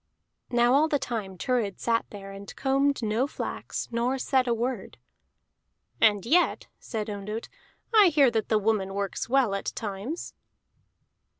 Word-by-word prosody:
Now 240 0 +3
all 295 +3 +5
the 295 - +1
time 220 -8 -4
Thurid 225 -3 -1
sat 230 -1 0
there, 195 -1 -9
and 195 0 -10
combed 275 -1 +1
no 220 +5 +1
flax, - - -5
nor 240 +3 0
said 260 0 +1
a 240 - +3
word. 235 -3 -3 1.0
"And 205 -3 +4
yet," 345 +9 +3
said 220 -2 -4
Ondott, 210 +2 -5 0.4
"I 425 -3 +8
hear 290 -6 +5
that 220 -2 -1
the 220 - +4
woman 200 -2 0
works 200 +2 -3
well 255 -5 +3
at 195 - -2
times." 215 - -5
230 Hz, 145 wpm, -27 LUFS, 205-265 Hz, 1.0 s, I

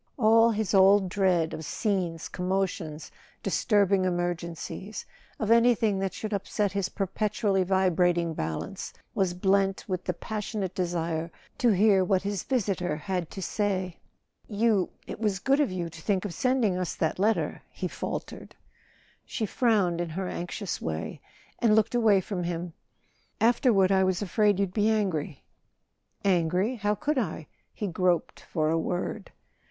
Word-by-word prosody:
All 225 -1 +5
his 220 -2 -1
old 195 0 +6
dread 180 -4 +1
of 160 - -5
scenes, 175 -2 -2
commotions, 180 -4 -3 0.3
disturbing 200 -3 +2
emergencies—of 175 +4 -4
anything 230 -4 +4
that 195 -1 -2
should 215 -1 -4
upset 200 0 -1
his 200 -1 -1
per¬ 195 -2 -2
petually 205 -1 0
vibrating 175 -2 +2
balance—was 155 - -4
blent 195 +1 +1
with 185 -2 -3
the 180 - -1
pas¬ 215 +4 -4
sionate 200 -3 -3
desire 170 -2 -2 0.3
to 245 - +4
hear 200 -1 +4
what 185 0 +1
his 200 -2 -2
visitor 195 - -1
had 180 +1 -3
to 195 - -6
say. 190 -4 -2 0.5
"You—it 210 -4 -1
was 210 -3 0
good 275 +7 +2
of 285 -9 +2
you 180 -2 -3
to 165 -1 -11
think 195 0 0
of 195 - -4
sending 230 -3 +1
us 180 - -2
that 160 +2 -1
letter," 215 +3 +1
he - - -4
faltered. - - -6 0.7
She 220 - -3
frowned 200 -7 +1
in 175 - -3
her 185 +4 -3
anxious 180 +2 -4
way 80 0 -4 0.4
and 220 -3 +4
looked 220 +1 +2
away 220 -5 +4
from 190 -1 -4
him. 170 0 -4 0.7
"Afterward 225 -5 +4
I 190 -1 +4
was 185 +1 0
afraid 205 0 +2
you'd 195 -2 0
be 210 +1 +2
angry." 185 -10 -1 0.8
"Angry? 185 +6 +2
How 210 0 0
could 290 +6 0
I?" 160 -8 -3 0.3
He 210 - -5
groped 180 -2 0
for 155 -1 -1
a 165 - +2
word. 180 +5 -3
190 Hz, 145 wpm, -27 LUFS, 175-210 Hz, 0.8 s, old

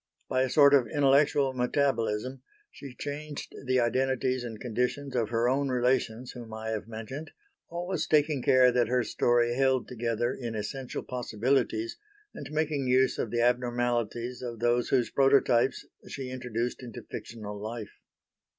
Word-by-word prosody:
By 130 - +1
a 130 - +1
sort 140 +2 +6
of 135 -4 +5
intellectual 140 -1 +3
metabolism 130 -2 0 0.3
she 135 -3 -10
changed 145 +1 -6
the 130 0 +3
identities 130 +1 +1
and 115 -3 -7
conditions 125 +3 -2
of 115 -3 0
her 115 +1 +1
own 135 +2 +1
relations 125 -1 0
whom 120 -2 -10
I 110 0 -5
have 110 -1 -3
mentioned, 115 +8 -7 0.4
always 175 -1 -3
taking 150 -2 +2
care 125 0 +5
that 120 -1 +2
her 125 0 +1
story 120 0 +2
held 130 -1 +2
together 120 0 -1
in 120 -3 -5
essential 125 +5 -4
possibilities, 130 - -1 0.4
and 140 - -8
making 150 -3 -1
use 130 +1 +3
of 115 - -1
the 120 +1 0
abnormalities 120 -1 0
of 120 -2 -5
those 120 +1 +1
whose 125 -3 +2
prototypes 135 -2 +3 0.2
she 130 -2 -6
introduced 125 -1 -3
into 120 -4 -8
fictional 105 -2 -7
life. 110 0 -6
125 Hz, 150 wpm, -28 LUFS, 120-135 Hz, 0.4 s, sort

